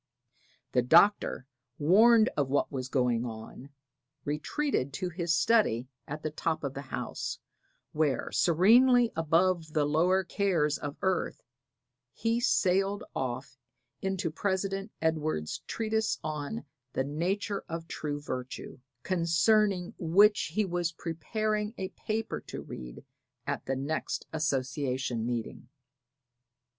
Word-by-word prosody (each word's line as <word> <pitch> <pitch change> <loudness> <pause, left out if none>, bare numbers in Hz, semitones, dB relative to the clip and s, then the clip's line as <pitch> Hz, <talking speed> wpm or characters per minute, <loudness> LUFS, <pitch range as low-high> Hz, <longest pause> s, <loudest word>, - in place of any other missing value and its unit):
The 125 - +3
Doctor, 165 +2 +4 0.3
warned 220 +8 +6
of 140 -3 0
what 140 - +1
was 130 -2 -4
going 125 -3 +1
on, 115 +3 -8 0.6
retreated 150 - -1
to 180 +5 -2
his 170 -1 -2
study 165 - +3 0.2
at 150 +2 -6
the 155 - -2
top 155 +1 -2
of 140 -2 -2
the 140 - -5
house, - - -4 0.5
where, 150 -5 0
serenely 235 +8 +5
above 165 0 +1
the 150 -2 +2
lower 175 +6 +3
cares 170 -6 +1
of 145 -1 -5
earth, 190 -1 0 0.7
he 230 +1 0
sailed 195 -4 +2
off 130 0 -4 0.4
into 190 -3 -1
President 195 +3 -2
Edwards' 155 - -1
treatise 220 0 0
on 155 +8 -4 0.3
the 130 - 0
nature 190 +8 -2
of 165 0 -5
true 145 -3 -4
virtue, 130 -2 -6 0.2
concerning 185 +2 +2
which 190 0 +4
he 215 - +2
was 175 -2 -1
preparing 210 +7 -2
a 190 -1 -3
paper 220 +1 -3
to - - -6
read - - -9 0.4
at - - -3
the 135 - 0
next 140 +4 -3
association 130 -5 -1
meeting. 120 0 -4
165 Hz, 120 wpm, -30 LUFS, 140-195 Hz, 0.7 s, warned